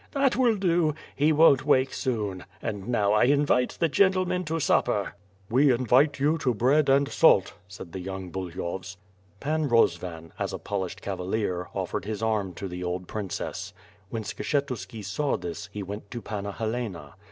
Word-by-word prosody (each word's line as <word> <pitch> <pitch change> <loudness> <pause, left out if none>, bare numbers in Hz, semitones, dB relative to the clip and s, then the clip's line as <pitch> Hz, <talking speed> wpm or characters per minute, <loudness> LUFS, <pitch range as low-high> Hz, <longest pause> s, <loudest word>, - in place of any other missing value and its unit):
"That 275 -2 +2
will 245 -4 +3
do! 170 -5 +2 0.2
He 150 +3 +3
won't 150 -4 +6
wake 130 -2 +3
soon; 105 -7 -2
and 105 -4 -5
now 105 -4 +2
I 105 - +5
invite 140 -2 +2
the 170 - +3
gentlemen 185 +3 +2
to 165 +1 -1
supper." 105 -8 +1 0.3
"We 135 +5 +4
invite 130 +4 +3
you 150 +4 +2
to 125 -4 +1
bread 135 +7 +3
and 140 +1 +4
salt," 120 - +4
said 95 -2 -10
the 95 - -5
young 95 0 -6
Buly 90 -2 -5
hovs. 95 +2 -5 0.4
Pan 155 0 0
Eosvan, 85 -7 +1
as - - -2
a - - -2
polished 95 -1 -4
cavalier, 90 -1 -2
offered - - -3
his 110 0 -4
arm 105 -4 0
to 100 - -5
the 90 0 -6
old 90 0 -3
princess. 100 -1 -5 0.4
When 115 0 -4
Skshetuski 115 -5 -3
saw 140 +9 0
this, 85 +3 -6
he 105 0 -5
went 100 +2 -7
to 120 - -5
Panna 100 -1 -4
Helena. 110 -10 -4
110 Hz, 170 wpm, -27 LUFS, 95-140 Hz, 0.4 s, won't